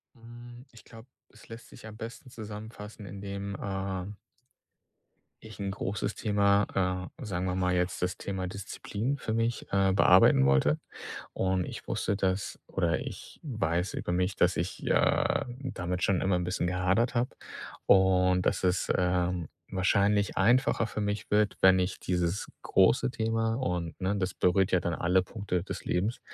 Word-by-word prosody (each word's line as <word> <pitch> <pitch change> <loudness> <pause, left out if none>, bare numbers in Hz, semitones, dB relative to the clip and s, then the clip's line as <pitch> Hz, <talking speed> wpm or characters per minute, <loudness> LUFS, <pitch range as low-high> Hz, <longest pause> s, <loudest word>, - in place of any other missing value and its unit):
Hm, 120 +2 -12
ich 115 - -16
glaube, 115 +2 -14 0.2
es - - -18
lässt 115 0 -10
sich - - -13
am 110 -1 -9
besten 115 +3 -8
zusammenfassen, 105 -1 -9
indem, 100 0 -6
äh 95 0 -4 1.3
ich 110 -3 -11
'n 100 -1 -2
großes 100 +1 -3
Thema, 100 -3 +1
äh, 135 - -8
sagen 95 -3 -2
wir 90 0 -1
mal 90 -1 +1
jetzt 90 0 -1
das 90 0 -1
Thema 95 -2 -4
Disziplin 105 +7 -4
für 110 -4 -3
mich, 115 +1 -1
äh, 95 -1 +3
bearbeiten 65 -7 +6
wollte. 70 +3 +3 0.5
Und 95 -1 0
ich - - -8
wusste, 100 - -1
dass 95 0 -1
oder 85 -4 0
ich - - -8
weiß 90 - -1
über - - -3
mich, 90 +1 0
dass - - +2
ich - - -3
ja - - +2
damit 90 -9 -3
schon 95 -3 +2
immer 95 -1 +2
'n 90 - -2
bisschen 90 0 -1
gehadert 95 +7 +1
habe 120 +2 0 0.5
und 95 -1 +4
dass 100 - +1
es, 90 +1 +1
ähm, 90 -2 0 0.2
wahrscheinlich 100 +2 +2
einfacher 115 +2 +3
für 105 - -5
mich 105 0 -2
wird, 105 0 +2
wenn 95 0 +7
ich 90 +1 -1
dieses 90 +1 -1 0.2
große 115 +6 +3
Thema 115 0 0
und 90 -10 -3
ne, 95 +2 0
das 95 -1 -1
berührt 90 +2 +2
ja 90 - +4
dann 85 -2 -1
alle 90 +2 +2
Punkte 90 -3 -3
des - - -7
Lebens, 100 +7 -1
95 Hz, 160 wpm, -29 LUFS, 90-110 Hz, 1.3 s, wenn